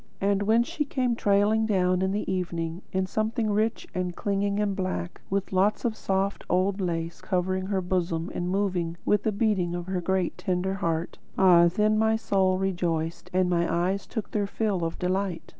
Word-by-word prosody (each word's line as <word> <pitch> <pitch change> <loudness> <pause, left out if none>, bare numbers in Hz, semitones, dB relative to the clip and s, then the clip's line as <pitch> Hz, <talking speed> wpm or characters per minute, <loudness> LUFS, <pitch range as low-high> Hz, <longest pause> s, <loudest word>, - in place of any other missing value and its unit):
And 200 0 +1
when 220 +3 +4
she 295 +5 -2
came 255 -4 0
trailing 210 +1 +2
down 185 -3 +2
in 190 0 +1
the 205 +2 -2
evening, 175 -2 -2
in 190 0 0
something 215 +3 -1
rich 220 +2 0
and 180 -1 -2
clinging 200 0 0
and 205 -2 0
black, 185 -2 -3
with 195 0 -2
lots 195 +5 +2
of 230 -2 0
soft 195 -1 -1
old 190 +2 +1
lace 165 -2 -3
covering 185 0 -1
her 195 -1 0
bosom 175 -2 -1
and 175 0 -2
moving 180 -4 -1
with 210 - +3
the 220 - 0
beating 200 -5 0
of 175 -1 -4
her 185 -1 -2
great 190 0 -1
tender 185 +1 -1
heart; 165 -3 -2 0.2
ah, 175 -2 +7
then 215 +4 +2
my 220 0 +3
soul 190 -4 +1
rejoiced 175 -4 -2
and 185 0 +2
my 170 -1 +1
eyes 185 +3 0
took 220 -3 -5
their 205 -2 0
fill 200 -4 -1
of 165 0 -2
delight! 180 -2 -1
190 Hz, 185 wpm, -27 LUFS, 180-205 Hz, 0.2 s, ah